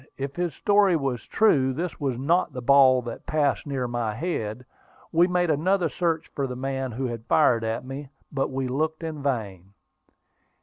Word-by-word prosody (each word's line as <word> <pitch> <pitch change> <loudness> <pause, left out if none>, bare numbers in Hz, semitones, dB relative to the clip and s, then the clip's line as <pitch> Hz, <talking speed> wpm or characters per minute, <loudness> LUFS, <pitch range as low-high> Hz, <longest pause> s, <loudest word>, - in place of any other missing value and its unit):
If 140 0 -4
his 175 -3 -2
story 200 -3 +3
was 135 -7 -2
true, 135 -12 +3
this 170 +5 -4
was 135 -5 -1
not 155 +4 +1
the 125 - -5
ball 130 -1 +6
that 120 - -8
passed 150 -2 0
near 135 -3 -2
my 120 -3 -2
head. 125 -6 -3 0.5
We 170 +2 +4
made 180 -2 +1
another 175 +3 +1
search 165 -2 -1
for 140 -1 -2
the 125 - -5
man 135 0 -3
who 130 +3 -3
had 120 -2 -5
fired 120 -7 +4
at 115 +2 -2
me, 135 +1 -7 0.2
but 135 -1 -1
we 135 0 -2
looked 155 +5 -2
in 155 -3 -5
vain. 100 -9 -3
135 Hz, 180 wpm, -25 LUFS, 125-160 Hz, 0.5 s, ball